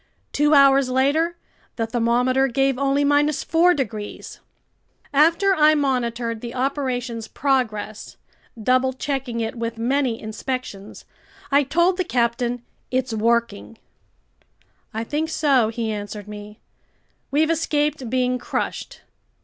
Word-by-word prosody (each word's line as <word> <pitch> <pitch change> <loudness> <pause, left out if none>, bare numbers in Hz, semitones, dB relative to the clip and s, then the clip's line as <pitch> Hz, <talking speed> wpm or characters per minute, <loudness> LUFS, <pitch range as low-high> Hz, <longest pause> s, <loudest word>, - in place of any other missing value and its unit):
Two 295 +1 +3
hours 275 -1 +5
later 290 +7 +1 0.4
the 225 - -1
thermometer 245 +3 +1
gave 270 +1 +1
only 280 +1 +2 0.3
4 340 +4 +2
degrees. 215 -6 -5 0.7
After 335 +7 +4
I 310 -3 +5
monitored 240 -5 -1
the 240 0 -7
operation's 255 -4 -2
progress, 220 -6 -2 0.4
double 255 +3 +2
checking 260 -3 -3
it 225 - -2
with 230 0 -4
many 245 0 0
inspections, 220 -2 -6 0.5
I 280 +1 +5
told 340 +6 +2
the 370 - +1
captain, 240 -4 -1 0.3
"It's 255 -2 -1
working." 230 -1 0 1.1
"I 220 +1 -3
think 300 +6 -2
so," 275 -8 +2
he 225 -1 -3
answered 205 0 -6
me. 210 0 -9 0.7
"We've 310 +3 +2
escaped 295 -5 -1
being 250 0 0
crushed. 245 - -4
255 Hz, 115 wpm, -22 LUFS, 230-285 Hz, 1.1 s, hours